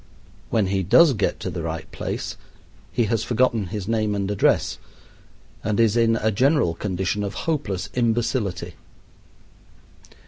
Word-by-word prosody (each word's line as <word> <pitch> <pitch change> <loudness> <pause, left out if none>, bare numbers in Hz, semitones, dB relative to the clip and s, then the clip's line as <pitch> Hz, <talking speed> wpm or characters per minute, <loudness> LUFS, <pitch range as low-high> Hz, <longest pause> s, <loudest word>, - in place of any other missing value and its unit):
When 110 -3 +2
he 95 0 0
does 150 - +6
get 110 - -1
to - - -3
the - - -4
right - - -4
place - - -4 0.6
he 120 - +1
has 110 0 0
forgotten 120 -4 +1
his 100 0 -5
name 110 -2 0
and 100 0 -1
address 105 - +1 0.8
and 105 0 0
is 115 -2 +4
in 115 -1 +3
a 110 0 +1
general 130 - +2
condition 95 +2 -2
of 100 - -4
hopeless 135 - -1
imbecility. 110 -7 -1
110 Hz, 140 wpm, -23 LUFS, 100-120 Hz, 0.8 s, does